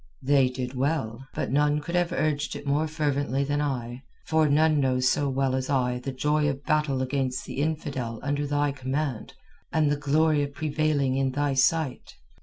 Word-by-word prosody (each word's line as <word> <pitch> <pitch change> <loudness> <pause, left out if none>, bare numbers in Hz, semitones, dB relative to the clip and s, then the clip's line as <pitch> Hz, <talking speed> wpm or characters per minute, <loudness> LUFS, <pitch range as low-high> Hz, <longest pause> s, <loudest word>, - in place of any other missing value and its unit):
"They 135 -1 +4
did 125 0 -5
well, 135 -3 -2
but - - -2
none 145 +2 +2
could 160 +3 -7
have 175 -1 +1
urged 155 -4 -1
it - - -8
more 145 +3 +1
fervently 145 -3 -1
than 145 +1 -1
I, 125 -3 -3 0.2
for 160 -1 +2
none 155 +1 +4
knows 130 -2 +2
so 140 +2 +2
well 135 0 0
as 130 0 -2
I 125 -3 +1
the 135 +2 -4
joy 150 +3 +1
of 140 0 -4
battle 150 -4 +1
against 130 -1 -2
the 140 - -4
infidel 140 -7 -3
under 145 +1 -1
thy 145 0 +1
command 135 -2 -3 0.4
and 155 -2 +2
the - - +2
glory 150 +1 +2
of 140 0 -4
prevailing 150 -3 0
in 135 -1 0
thy 145 0 0
sight. 135 +1 +1
140 Hz, 185 wpm, -26 LUFS, 130-150 Hz, 0.4 s, They